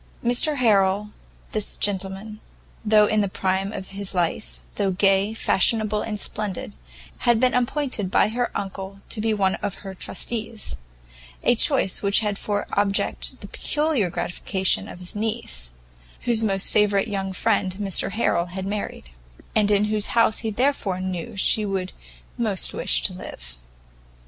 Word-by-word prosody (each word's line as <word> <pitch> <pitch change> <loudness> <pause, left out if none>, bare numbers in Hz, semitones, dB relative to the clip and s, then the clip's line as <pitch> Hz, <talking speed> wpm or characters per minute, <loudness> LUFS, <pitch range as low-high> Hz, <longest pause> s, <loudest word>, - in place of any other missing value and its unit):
Mr 245 +6 +4
Harrel, 210 -4 +2 0.4
this 215 -1 -3
gentleman, 200 +2 -2 0.4
though 210 -1 +5
in 215 0 +2
the 200 - +1
prime 190 +1 -1
of 190 -3 -6
his 200 0 -4
life, - - -2
though 195 - 0
gay, 195 +2 +2
fashionable 215 -1 +2
and 210 -2 -3
splendid, 200 - -3 0.5
had 235 -2 +3
been 255 +1 +3
appointed 250 -5 0
by 205 - +3
her 240 +2 -1
uncle 195 0 -6
to 215 - -2
be 225 +1 +1
one 195 -3 +2
of 205 -2 -2
her 195 - -5
trustees; 215 - -2 0.7
a - - +5
choice 245 -4 +3
which 200 +2 +3
had 205 -2 -2
for 205 -1 -2
object 200 0 0
the - - -8
peculiar 295 - 0
gratification 190 +2 +1
of - - -9
his 180 +2 -4
niece, 60 - -2 0.5
whose 230 -2 +3
most 195 -3 +2
favourite 205 0 +3
young 195 -2 -2
friend 190 -1 0
Mr 195 -2 +1
Harrel 180 -5 +1
had 190 +2 -5
married, 200 - -5 0.4
and 210 -1 +3
in 205 0 +3
whose 210 -1 0
house 230 -2 +4
he 225 - -2
therefore 220 -5 0
knew 185 0 -4
she 215 +3 +5
would 190 -2 -3 0.5
most 210 -5 -1
wish 60 0 +1
to - - 0
live. - - -7
205 Hz, 155 wpm, -23 LUFS, 190-220 Hz, 0.7 s, though